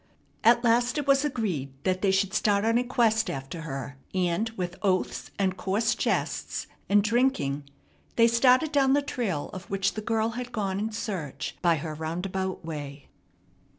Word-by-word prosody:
At 235 +2 +5
last 240 +3 +3
it 295 - -1
was 275 0 +4
agreed 195 - -2
that 185 0 0
they 200 - +3
should 190 +1 +2
start 205 -1 +2
on 230 +1 +3
a - - +1
quest 225 -4 +2
after 140 +1 -5
her, 135 -3 -6 0.2
and 180 +4 +1
with 180 -1 -3
oaths, 190 -3 0
and 190 -2 +1
coarse 205 +5 +1
jests, - - -1 0.2
and 205 0 +5
drinking, 210 - +1 0.5
they 230 0 +6
started 250 +6 +4
down 270 -3 +4
the 285 0 +3
trail 205 - -2
of 185 0 -8
which 195 0 0
the 215 - -4
girl 225 0 0
had 245 +1 -5
gone 200 -4 -2
in 220 +2 -2
search 185 - -4
by 170 -1 +4
her 155 0 -4
roundabout 180 +4 -3
way. 145 -3 -7
200 Hz, 170 wpm, -27 LUFS, 175-235 Hz, 0.5 s, they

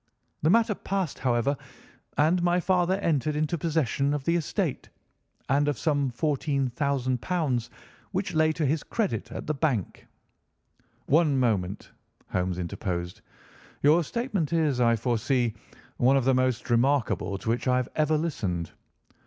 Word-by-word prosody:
The 155 - +3
matter 225 +2 +4
passed, 195 -5 -3
however, 130 +2 +1 0.6
and 165 +4 +3
my 175 +1 +2
father 180 0 +2
entered 150 -3 +1
into 155 +2 0
possession 150 -3 0
of 145 - -4
the 170 +4 +1
estate, 165 -5 -2 0.6
and 145 +2 +2
of 145 -4 0
some 145 -4 +1
£ - - -21
14,000, 140 -1 0 0.4
which 195 0 -2
lay 155 0 +3
to 155 -1 -1
his 150 +3 +1
credit 220 -4 -2
at - - -6
the 155 - -1
bank." 135 - -2 1.0
"One 150 -2 +3
moment," 105 -5 -1 0.4
Holmes 90 -1 -1
interposed, 90 -1 -4 0.6
"your 155 +4 +5
statement 210 - -2
is, 150 -6 +2
I 115 -1 +4
foresee, 120 +1 0 0.4
one 130 +3 +4
of 130 - 0
the 135 - +4
most 130 -1 0
remarkable 120 -5 +1
to 110 - -5
which 120 +3 0
I 125 0 +3
have 125 -1 -1
ever 155 0 +2
listened. 100 - -2
140 Hz, 145 wpm, -27 LUFS, 120-160 Hz, 1.0 s, your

